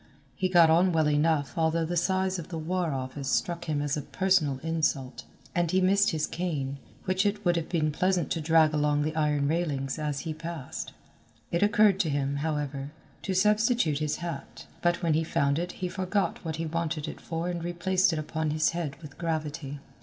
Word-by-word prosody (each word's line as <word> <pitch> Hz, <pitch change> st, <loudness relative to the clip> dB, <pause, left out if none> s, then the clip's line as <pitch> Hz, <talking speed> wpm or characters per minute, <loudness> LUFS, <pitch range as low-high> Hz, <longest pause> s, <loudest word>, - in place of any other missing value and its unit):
He 185 Hz, -3 st, 0 dB
got 170 Hz, -3 st, +6 dB
on 180 Hz, +3 st, +4 dB
well 160 Hz, -2 st, +3 dB
enough 150 Hz, 0 st, +1 dB
although 165 Hz, 0 st, +1 dB
the 175 Hz, +2 st, -2 dB
size 185 Hz, +1 st, +1 dB
of 165 Hz, -, -7 dB
the 170 Hz, -, -5 dB
War 170 Hz, +1 st, -1 dB
Office 130 Hz, +1 st, -4 dB
struck 170 Hz, -1 st, 0 dB
him 150 Hz, -2 st, -1 dB
as 145 Hz, -1 st, 0 dB
a 150 Hz, -, -2 dB
personal 175 Hz, -4 st, +1 dB
insult, 155 Hz, -5 st, -1 dB, 0.3 s
and 175 Hz, -1 st, +1 dB
he 185 Hz, +2 st, +3 dB
missed 195 Hz, +2 st, +4 dB
his 155 Hz, -1 st, 0 dB
cane, 145 Hz, -6 st, -3 dB, 0.3 s
which 185 Hz, 0 st, +1 dB
it 205 Hz, 0 st, -1 dB
would 175 Hz, 0 st, +3 dB
have 165 Hz, -1 st, -2 dB
been 155 Hz, -3 st, +1 dB
pleasant 180 Hz, +3 st, 0 dB
to 165 Hz, -, 0 dB
drag 160 Hz, 0 st, +4 dB
along 150 Hz, -1 st, +2 dB
the 155 Hz, +1 st, -2 dB
iron 150 Hz, -2 st, +1 dB
railings 145 Hz, -4 st, -1 dB
as 150 Hz, -2 st, -2 dB
he 160 Hz, -, -4 dB
passed. 165 Hz, -3 st, -6 dB, 0.6 s
It 170 Hz, -, +1 dB
occurred 205 Hz, -1 st, +4 dB
to 175 Hz, -6 st, +2 dB
him, 140 Hz, 0 st, -1 dB
however, 145 Hz, -2 st, -2 dB, 0.3 s
to 190 Hz, -, -2 dB
substitute 210 Hz, -, +3 dB
his 155 Hz, -1 st, 0 dB
hat, 170 Hz, -4 st, -7 dB, 0.2 s
but 175 Hz, +1 st, +1 dB
when 165 Hz, -2 st, +3 dB
he 160 Hz, +1 st, +2 dB
found 140 Hz, -1 st, +1 dB
it 175 Hz, +1 st, -3 dB
he 185 Hz, -, -3 dB
forgot 190 Hz, +2 st, -1 dB
what 160 Hz, -2 st, -3 dB
he 165 Hz, +1 st, -3 dB
wanted 165 Hz, -1 st, -2 dB
it -, -, -7 dB
for 165 Hz, +1 st, -3 dB
and 175 Hz, -1 st, -3 dB
replaced 180 Hz, +2 st, +2 dB
it 160 Hz, -, -2 dB
upon 155 Hz, +1 st, -2 dB
his 155 Hz, +1 st, +2 dB
head 165 Hz, -5 st, -3 dB
with 145 Hz, -2 st, -11 dB
gravity. 155 Hz, -3 st, -3 dB
160 Hz, 200 wpm, -28 LUFS, 150-180 Hz, 0.6 s, got